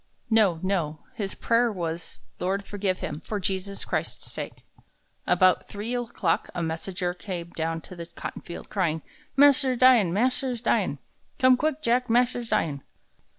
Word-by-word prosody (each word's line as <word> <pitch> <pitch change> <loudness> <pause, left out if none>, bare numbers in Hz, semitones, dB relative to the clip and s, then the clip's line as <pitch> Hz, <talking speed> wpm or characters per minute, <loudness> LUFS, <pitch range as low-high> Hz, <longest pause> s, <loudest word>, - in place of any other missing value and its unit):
No, 205 -7 +4
no! 170 -6 -1
His 195 -3 -4
prayer 235 0 +2
was, 170 -3 -5 0.2
"Lord, 195 +2 -1
forgive 195 -3 -2
him, 150 +1 -4
for 210 - -3
Jesus 195 +1 -2
Christ's - - -3
sake." - - -6 0.6
About 185 -1 +4
three 210 +4 -4
o'clock, 230 -8 0
a 175 - -1
messenger 175 +2 -2
came 175 -1 -6
down 165 0 -2
to 185 - -11
the 170 -1 -7
cotton - - -7
field, 170 - -8
crying: 160 -6 -1 0.3
"Mas'r 275 -2 +6
dyin'! 240 -7 +6
Mas'r's 250 +4 +1
dyin'! - - +1 0.4
Come 255 -2 +6
quick, 310 +3 -1
Jack. 250 0 +2
Mas'r's 245 0 +2
dyin'!" 155 -10 0
195 Hz, 150 wpm, -26 LUFS, 170-240 Hz, 0.6 s, Mas'r